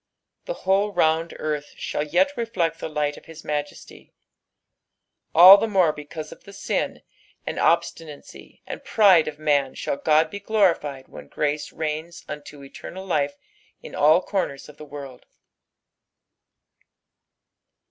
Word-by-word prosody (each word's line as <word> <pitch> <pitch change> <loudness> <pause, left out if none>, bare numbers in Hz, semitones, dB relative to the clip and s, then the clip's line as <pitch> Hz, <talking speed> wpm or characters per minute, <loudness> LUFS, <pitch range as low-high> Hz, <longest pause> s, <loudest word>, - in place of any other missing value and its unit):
The - - -4
whole 200 +2 +2
round 165 -2 +1
earth 150 -1 -4
shall - - -3
yet 280 - +1
reflect 185 -9 -2
the - - -5
liuht 150 -1 -2
of - - -15
his 160 -1 -12
majesty. 145 -1 -6 1.2
All 185 +4 +10
the 225 - 0
more 185 -7 +3
because 150 +1 -8
of - - -13
the 200 - -13
sin, 200 - -3 0.4
and - - -4
obstinacy, 155 -3 -2
and - - -7
pride 190 -7 +5
Of 150 -1 -5
man 145 -3 +1
shall 140 - -3
Qod 155 0 +2
be 200 - -6
glorified 175 -10 0
when - - -12
grace 150 0 -2
reigns 160 +2 -5
unto 150 -1 -9
eternal 185 +7 -10
life 145 -6 -1 0.5
in - - -10
all 155 +5 +4
comers 180 -9 -3
of 150 - -15
the 150 - -10
world. 140 -3 -10
155 Hz, 135 wpm, -23 LUFS, 145-190 Hz, 1.2 s, All